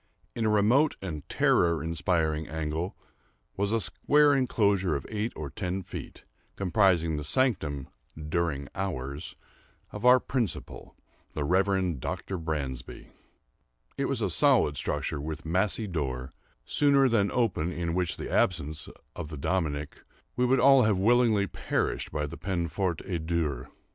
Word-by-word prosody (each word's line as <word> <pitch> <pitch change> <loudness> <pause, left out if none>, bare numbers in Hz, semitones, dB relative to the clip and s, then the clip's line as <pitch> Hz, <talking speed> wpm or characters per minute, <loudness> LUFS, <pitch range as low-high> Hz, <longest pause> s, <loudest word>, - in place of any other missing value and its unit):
In 115 - -1
a - - +3
remote 115 +9 +3
and 80 -6 -6
terror 85 -3 +2
inspiring 80 -1 0
angle 80 +3 -3 0.6
was 100 +1 0
a 115 - +2
square 145 +5 +3
enclosure 100 - +2
of 70 - -4
eight 110 +1 -2
or 75 -3 -6
ten 95 +5 -3
feet, - - -9 0.3
comprising 90 -5 +2
the 75 - -4
sanctum, 75 - 0 0.3
"during 75 -2 -2
hours," 75 -6 -4 0.6
of 105 - -7
our 125 +1 +7
principal, 120 -6 -3 0.4
the 75 - -1
Reverend 95 -1 +1
Dr. 95 +8 -4
Bransby. 75 -6 -5 0.9
It - - -1
was - - -1
a - - +1
solid 75 - +4
structure, 70 - -2
with 80 +2 -6
massy 95 +6 0
door, 70 -8 -3 0.3
sooner 140 -2 +4
than 105 -5 +2
open 90 -7 -1
which 90 -1 -1
in - - -5
the - - -6
absence 80 -3 0 0.3
of 80 - -5
the 75 - -7
"Dominie," 75 -2 -1 0.5
we 125 0 +2
would 130 +1 +3
all 135 +1 +7
have 110 -4 +3
willingly 110 0 +3
perished - - -2
by 75 0 -1
the 75 - -7
peine 90 -3 -2
forte 90 -1 -2
et 85 -4 -4
dure. 75 -7 -1
90 Hz, 145 wpm, -28 LUFS, 75-105 Hz, 0.9 s, our